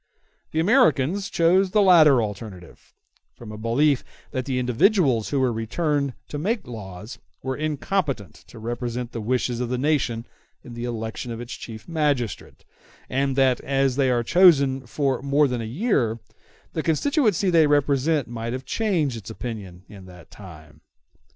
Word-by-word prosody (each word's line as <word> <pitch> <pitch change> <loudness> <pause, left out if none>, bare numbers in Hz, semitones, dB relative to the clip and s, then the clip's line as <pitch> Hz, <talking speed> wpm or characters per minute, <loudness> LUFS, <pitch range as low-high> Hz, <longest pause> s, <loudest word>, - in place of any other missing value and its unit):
The 160 - -2
Americans 195 - +2
chose 185 +3 +3
the 210 +2 +3
latter 155 - +6
alternative, 100 -4 -9 0.4
from 115 -3 -10
a - - -7
belief 130 +5 +2 0.3
that 130 -1 -3
the 130 -2 -2
individuals 125 - +2
who 140 - 0
were 130 -2 +1
returned 140 +4 -1
to 145 - -4
make 210 +6 -1
the - - -11
laws 105 0 -9 0.2
were 130 0 -2
incompetent 145 - -2
to 105 - -14
represent 120 +1 -4
the 115 - -5
wishes 125 +1 -1
of 125 -1 -2
the 125 - -1
nation 125 -5 0 0.4
in 120 - -10
the 120 +1 -5
election 115 0 -5
of 115 - -6
its 120 0 -7
chief 110 -2 -9
magistrate; 145 - -2 0.5
and 135 0 0
that, 130 -2 +3
as 135 -2 0
they 135 -1 +2
are 120 -1 +1
chosen 140 -5 +4
for 135 +2 -1
more 140 +2 +3
than 125 -2 -3
a - - -4
year, 120 - 0 0.6
the 160 - -1
constituency 200 - +1
they 165 -3 +5
represent 145 0 +1
might 115 0 -5
have 130 +1 -5
changed 175 - 0
its 105 -1 -9
opinion 100 -5 -7
in 100 -3 -13
that 90 -2 -15
time. 80 -6 -13
130 Hz, 165 wpm, -23 LUFS, 115-155 Hz, 0.6 s, latter